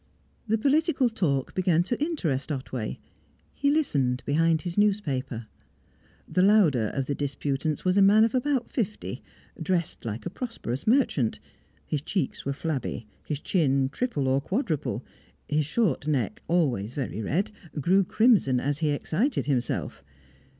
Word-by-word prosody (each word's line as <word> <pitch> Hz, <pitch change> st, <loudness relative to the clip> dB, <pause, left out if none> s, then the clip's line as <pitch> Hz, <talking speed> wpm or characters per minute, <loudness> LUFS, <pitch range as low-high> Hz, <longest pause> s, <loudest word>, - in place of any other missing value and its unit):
The 220 Hz, +1 st, +2 dB
political 285 Hz, +2 st, +2 dB
talk 145 Hz, -, -1 dB
began 175 Hz, -3 st, +2 dB
to 240 Hz, +9 st, -2 dB
interest 165 Hz, -, -1 dB
Otway; 130 Hz, -5 st, -4 dB, 0.6 s
he 280 Hz, -, +1 dB
listened, 140 Hz, -, +1 dB
behind 160 Hz, +2 st, +2 dB
his 175 Hz, -2 st, -4 dB
newspaper. 145 Hz, -, 0 dB, 0.8 s
The 180 Hz, -, +1 dB
louder 185 Hz, -, +4 dB
of 135 Hz, -, 0 dB
the 140 Hz, -, -1 dB
disputants 145 Hz, +2 st, -2 dB
was 185 Hz, +1 st, +3 dB
a -, -, +6 dB
man 205 Hz, +3 st, +6 dB
of 225 Hz, -, +2 dB
about 260 Hz, -1 st, +1 dB
fifty, 215 Hz, -4 st, -3 dB, 0.4 s
dressed 175 Hz, -4 st, -1 dB
like 110 Hz, 0 st, -5 dB
a 175 Hz, -, -3 dB
prosperous 205 Hz, -, -5 dB
merchant; 220 Hz, -, +2 dB, 0.5 s
his 150 Hz, -, -2 dB
cheeks 160 Hz, -2 st, -2 dB
were 140 Hz, -, 0 dB
flabby, 135 Hz, -6 st, -3 dB, 0.2 s
his 150 Hz, -2 st, -2 dB
chin 140 Hz, -7 st, +1 dB
triple 150 Hz, -, -1 dB
or 135 Hz, +1 st, +2 dB
quadruple, 185 Hz, -, -2 dB, 0.4 s
his 150 Hz, -1 st, 0 dB
short 180 Hz, -4 st, 0 dB
neck, 155 Hz, -, -1 dB
always 125 Hz, -, +1 dB
very 130 Hz, -5 st, -3 dB
red, 170 Hz, -, 0 dB, 0.3 s
grew 185 Hz, +7 st, +4 dB
crimson 195 Hz, -, +3 dB
as 145 Hz, +3 st, -1 dB
he 155 Hz, -2 st, +1 dB
excited 185 Hz, -, 0 dB
himself. 125 Hz, -, -2 dB
160 Hz, 145 wpm, -27 LUFS, 135-215 Hz, 0.8 s, a